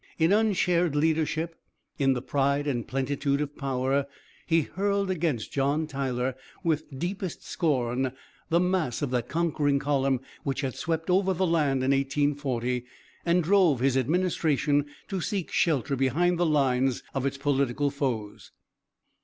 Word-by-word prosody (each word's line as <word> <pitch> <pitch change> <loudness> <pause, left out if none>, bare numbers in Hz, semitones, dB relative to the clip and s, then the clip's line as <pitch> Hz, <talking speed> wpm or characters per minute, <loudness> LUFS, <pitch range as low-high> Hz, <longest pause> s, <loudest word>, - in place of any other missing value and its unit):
In 165 +3 +3
unshared 180 -6 +2
leadership, 160 +2 0 0.4
in 135 -1 +4
the 125 -1 -4
pride 140 +1 +1
and 125 -5 -2
plentitude 140 +1 -1
of 150 -1 -3
power, 135 0 0 0.4
he 165 -1 +4
hurled 200 +3 -1
against 155 -10 -1
John 140 +3 +1
Tyler, 130 -3 -2 0.3
with 155 -4 -1
deepest 180 +3 -4
scorn 130 -5 0 0.4
the 170 - +3
mass 180 -8 0
of 135 - -1
that 125 -1 -1
conquering 155 -4 +1
column 135 -2 +1 0.2
which 135 -1 -2
had 135 -3 -2
swept 165 +2 -2
over 190 0 +3
the 185 +2 +1
land 150 -6 +1
in 135 - +2
1840, 135 -3 0 0.4
and 175 +1 +3
drove 175 -6 +4
his 130 +1 +2
administration 150 -1 +1 0.2
to 190 -3 -3
seek 195 -1 -2
shelter 145 -4 +1
behind 165 +7 +1
the 175 - +3
lines 135 -4 +2
of 135 0 0
its 140 - -3
political 140 0 +1
foes. 120 -7 -3
145 Hz, 145 wpm, -27 LUFS, 135-170 Hz, 0.4 s, in